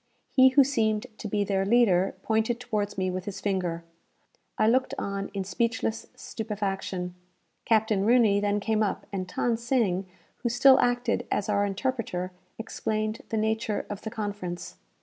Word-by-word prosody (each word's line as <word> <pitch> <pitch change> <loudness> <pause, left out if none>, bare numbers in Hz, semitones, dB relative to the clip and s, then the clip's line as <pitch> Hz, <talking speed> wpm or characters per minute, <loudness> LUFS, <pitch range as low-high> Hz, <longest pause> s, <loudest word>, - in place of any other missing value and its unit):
He 260 0 +7
who 275 +2 +6
seemed 220 -5 0
to - - -4
be 205 0 0
their 195 -1 0
leader, 195 -4 +3
pointed 220 +2 +1
towards 210 -5 -2
me 185 -1 0
with 185 0 -4
his 205 - -5
finger. 180 -4 -1 0.7
I 215 - +3
looked 260 +3 +2
on 200 0 -3
in 195 - -1
speechless 225 +3 -1
stupefaction. 195 -4 -4 0.5
Captain 220 -3 +2
Rooney 220 -3 +4
then 205 0 +1
came 215 +1 0
up, 210 - -1
and 185 -2 -3
Than 235 -2 +2
Sing, 225 -6 0 0.3
who 240 - -2
still 260 +3 +6
acted 245 -1 +1
as 210 0 -1
our 205 -1 +2
interpreter, 200 -4 -2 0.3
explained 215 -1 -3
the 225 - -1
nature 220 0 -1
of 205 0 -5
the 220 - -5
conference. 205 -5 -5
215 Hz, 155 wpm, -27 LUFS, 195-230 Hz, 0.7 s, He